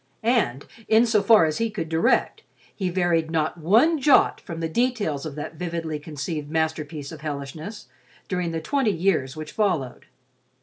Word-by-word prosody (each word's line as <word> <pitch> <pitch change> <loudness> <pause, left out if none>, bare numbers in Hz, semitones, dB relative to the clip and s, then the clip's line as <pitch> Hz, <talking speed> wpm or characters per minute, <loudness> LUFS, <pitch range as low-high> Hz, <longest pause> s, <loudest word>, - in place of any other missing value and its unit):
And, 220 - +1 0.2
in 225 +2 +5
so 220 -3 +3
far 220 -7 +6
as 155 -1 -2
he 230 0 +1
could 205 -6 -4
direct, 160 +1 +1 0.3
he 190 -3 -2
varied 175 -3 +1
not 160 +1 -1
one 230 - +4
jot 280 0 +4
from 165 -1 -7
the 165 - -1
details 205 - -1
of 145 - -8
that 155 +2 -6
vividly 165 -3 -3
conceived 150 0 -5
masterpiece 155 -2 -2
of 160 -2 -10
hellishness 155 +7 -6 0.4
during 180 -2 -1
the 165 -1 -3
twenty 270 - +1
years 165 -8 0
which 155 -1 -7
followed. 170 - -1
165 Hz, 165 wpm, -24 LUFS, 155-210 Hz, 0.4 s, far